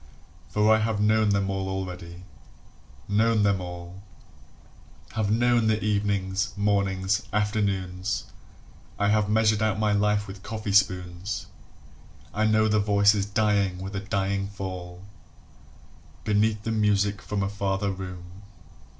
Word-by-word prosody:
For 105 +1 +4
I - - +1
have 110 -1 0
known 110 0 +3
them 100 -1 +1
all 95 0 -2
already, 90 -2 -6 0.8
known 110 +1 +2
them 100 -2 +2
all: 90 +1 -8 1.1
Have 110 -2 -1
known 120 +1 +3
the 110 0 +2
evenings, 100 -2 0
mornings, 100 0 +1
afternoons, 100 -2 -1 0.7
I 100 0 +1
have 105 -1 +2
measured 110 0 +3
out 110 -2 +1
my 105 -1 +1
life 105 0 +2
with 95 0 -9
coffee 110 0 -4
spoons; 95 -1 +1 0.9
I 110 +1 +1
know 110 0 +3
the 105 0 +2
voices 100 0 +3
dying 100 -3 +1
with 95 +2 -6
a - - -1
dying 100 0 -1
fall 90 -2 -7 1.2
Beneath 105 0 +1
the 115 - -2
music 105 -2 +1
from 100 -1 -2
a - - 0
farther 100 0 -1
room. 90 0 -8
100 Hz, 130 wpm, -26 LUFS, 95-105 Hz, 1.2 s, For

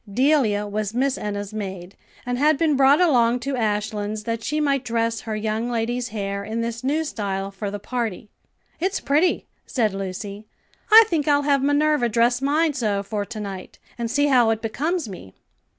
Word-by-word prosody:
Delia 245 -4 +2
was 210 +1 -3
Miss 265 +1 +1
Enna's 205 0 -5
maid, 190 -3 -6 0.3
and 245 0 -2
had 305 +1 +4
been 310 -2 +2
brought 275 +2 +5
along 250 -8 +3
to 275 +2 -2
Ashlands 210 -1 -2
that 230 0 -3
she 305 +5 -1
might 280 -3 +1
dress 230 -1 -1
her 220 -2 -4
young 220 +2 -2
lady's 240 +1 -1
hair 200 -3 -4
in 220 +3 -3
this 230 +1 -4
new 300 +4 +1
style 200 -8 -3
for 200 +1 -5
the 205 - -4
party. 225 -2 -4 0.5
"It's 375 +4 0
pretty," 310 +6 +1 0.2
said 220 -6 0
Lucy. 195 +2 -6 0.4
"I 445 +1 +11
think 320 -7 -1
I'll 290 -1 +3
have 280 -1 +2
Minerva 290 -2 +2
dress 235 +3 +2
mine 300 +3 +2
so 210 -7 -1
for 205 0 -3
to 215 +2 -7
night, 195 -3 -7 0.2
and 235 -1 -3
see 285 +5 +2
how 250 -5 +4
it 225 0 -1
becomes 305 +7 -1
me." 135 - -10
230 Hz, 180 wpm, -23 LUFS, 210-280 Hz, 0.5 s, I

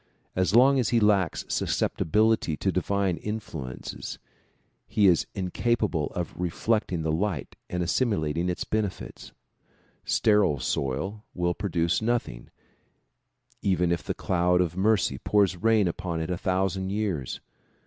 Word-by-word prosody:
As 95 +2 +1
long 135 +3 +6
as 125 - +1
he 120 - +3
lacks 100 -5 +2
susceptibility 105 -2 +1
to 95 - 0
divine 95 0 0
influences 80 - -6 0.7
he 105 - +2
is 90 -4 +4
incapable 95 -3 0
of 90 -2 -3
reflecting 90 0 -1
the 80 - 0
light 90 +1 -2
and 90 0 -1
assimilating 85 - 0
its 90 - -2
benefits. 105 -3 -4 0.7
Sterile 105 -9 +3
soil 70 - -2
will 90 0 0
produce 85 -2 0
nothing 115 - -2 1.1
even 90 -2 +1
if 85 -3 0
the - - -4
cloud 90 0 +1
of 85 -2 0
mercy 95 -8 +2
pours 100 -3 +2
rain 110 +1 +3
upon 85 -1 -3
it 80 +2 -3
a - - 0
thousand 95 0 0
years. 100 - -2
95 Hz, 130 wpm, -27 LUFS, 85-105 Hz, 1.1 s, long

